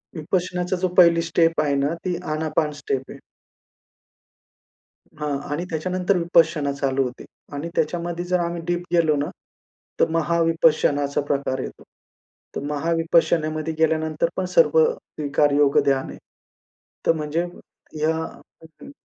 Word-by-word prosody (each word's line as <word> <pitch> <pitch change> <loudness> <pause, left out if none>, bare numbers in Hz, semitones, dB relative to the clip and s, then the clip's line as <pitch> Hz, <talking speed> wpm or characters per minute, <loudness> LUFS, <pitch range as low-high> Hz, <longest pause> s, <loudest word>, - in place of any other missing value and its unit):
विपश्यनाचा 180 +3 -1
जो 185 - +2
पहिली 170 -2 +7
स्टेप 165 -1 +2
आहे 145 -2 +1
ना, 140 +3 +1
ती 180 -1 0 0.2
आनापान 155 0 0
स्टेप 135 -1 -2
आहे. - - -10 2.0
हां. 150 -2 -1
आणि 160 +5 -2
त्याच्यानंतर 185 +4 0
विपश्यना 165 -4 +2
चालू 135 -1 0
होते. 125 -1 -6 0.3
आणि 145 +4 -4
त्याच्यामध्ये 175 +2 -1
जर 180 0 +1
आम्ही 170 0 -2
डीप 175 0 -1
गेलो 165 -3 +3
ना, 145 0 -1 0.7
तर - - +4
महाविपश्यनाचा 165 -3 +2
प्रकार 140 -2 -1
येतो. - - -7 0.7
तर - - -3
महाविपश्यनामध्ये 160 0 +1
गेल्यानंतर 160 0 +1
पण 185 - -1
सर्व 480 -1 +5
स्वीकार 145 - -1
योग 145 -1 +4
ध्यान 135 -1 +1
आहे. - - -9 0.9
तर - - +5
म्हणजे 155 +2 -1
ह्या 160 -2 -5 0.7
हं. - - -10
160 Hz, 125 wpm, -23 LUFS, 145-170 Hz, 2.0 s, पहिली